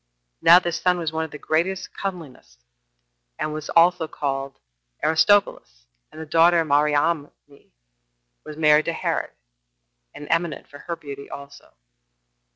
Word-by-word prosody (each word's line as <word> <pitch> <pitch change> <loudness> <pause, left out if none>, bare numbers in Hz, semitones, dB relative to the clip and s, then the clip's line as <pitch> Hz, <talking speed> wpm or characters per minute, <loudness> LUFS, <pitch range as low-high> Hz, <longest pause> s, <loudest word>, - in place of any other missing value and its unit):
Now 170 - +8
this 175 -2 -1
son 180 -1 +2
was 165 -3 -3
one 160 0 -2
of - - -10
the 150 - -9
greatest 170 +6 -2
comeliness, 160 - -7 0.8
and 155 - -3
was 155 -1 -7 0.4
called 135 -1 -4 0.5
Aristobulus; 160 - +1 0.3
and 155 - -12
the 160 - -6
daughter, 165 +1 +3
Mariamne, 145 +1 +1 1.1
was 150 0 -10
married 150 -1 +4
to 170 - -2
Herod, - - -2 0.9
and 145 - -9
eminent 165 -2 -1
for 145 - -14
her 170 +2 -5
beauty 140 -3 -10
also. 140 0 -12
155 Hz, 130 wpm, -23 LUFS, 145-170 Hz, 1.1 s, Now